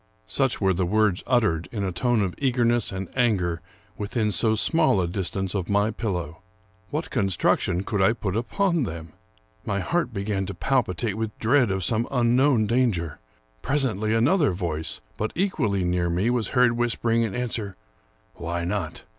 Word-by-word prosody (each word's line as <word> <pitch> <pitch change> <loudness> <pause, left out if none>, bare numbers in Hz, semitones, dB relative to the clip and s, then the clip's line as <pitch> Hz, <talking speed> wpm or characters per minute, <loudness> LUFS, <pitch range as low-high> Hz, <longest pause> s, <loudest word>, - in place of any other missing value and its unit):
Such - - 0
were 95 -1 +2
the 95 +1 0
words 105 -1 +2
uttered, 110 -10 +1
in 105 -4 -3
a 95 - -1
tone 115 +4 +1
of 90 -2 -2
eagerness 120 -4 +1
and 95 -1 -4
anger, 95 -9 +1 0.4
within 105 +1 -1
so 110 +3 +2
small 110 - +3
a 90 - +1
distance 95 +1 -2
of 95 -4 -2
my 100 +2 +2
pillow. 90 -8 -4 0.5
What 155 +3 -3
con 95 -1 +1
struction 90 0 +1
could 105 -2 -1
I 110 +4 +4
put 105 -4 -3
upon 170 - 0
them? 85 - -5 0.5
My 100 - -1
heart 170 - 0
began 100 -1 -2
to 100 - -5
pal 135 +8 +2
pitate 105 +1 -3
with 110 +1 -4
dread 125 +1 +3
of 95 -1 -1
some 115 +4 0
unknown 125 -1 +3
danger. 105 - 0 0.4
Presently, 110 - 0
another 145 - +3
voice, 80 -4 -3 0.2
but 110 - -2
equally 115 - 0
near 90 0 0
me, 95 +8 +1
was 120 -3 0
heard 125 -1 +6
whispering 115 -1 0
in 110 -4 -1
answer, 115 -5 -3 0.3
" - - -38
Why 85 +1 -3
not? 90 -3 -3
105 Hz, 170 wpm, -25 LUFS, 95-120 Hz, 0.5 s, heard